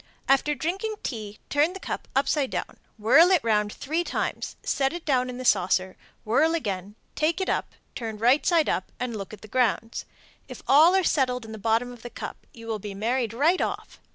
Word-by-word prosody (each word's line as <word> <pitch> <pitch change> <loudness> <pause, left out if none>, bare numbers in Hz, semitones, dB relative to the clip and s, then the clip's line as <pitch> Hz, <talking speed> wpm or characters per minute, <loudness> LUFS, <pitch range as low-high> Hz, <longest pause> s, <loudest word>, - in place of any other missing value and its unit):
After 285 +2 +3
drinking 385 - -2
tea, 215 -4 -5
turn 295 +5 +3
the 385 - -8
cup - - -5
upside 275 0 +2
down, - - -4 0.2
whirl 275 +11 +6
it 365 -6 +3
round 210 -2 +1
three 315 +9 -2
times, - - -3
set 270 +1 0
it 345 -1 -7
down 255 -3 +1
in 250 - -6
the 255 - -6
saucer, 185 -2 +2 0.3
whirl 290 +9 +3
again, 200 - -4 0.2
take 320 +4 0
it 380 - -1
up, - - -1 0.2
turn 225 -3 -5
right 245 +7 +4
side 335 -3 +3
up, 185 - -1
and 245 -2 -3
look 195 -2 -6
at 215 - -11
the 215 - -11
grounds. 230 -1 0 0.4
If - - -10
all 315 +7 +7
are 380 - +3
settled 250 -7 +1
in 220 - -9
the 220 - -7
bottom 230 +4 +1
of 245 -2 -12
the 240 - -7
cup, - - -8
you 230 -1 -12
will 220 -2 -3
be 200 0 -7
married 230 +2 0
right 305 +10 +2
off. - - -4
250 Hz, 210 wpm, -26 LUFS, 220-305 Hz, 0.4 s, all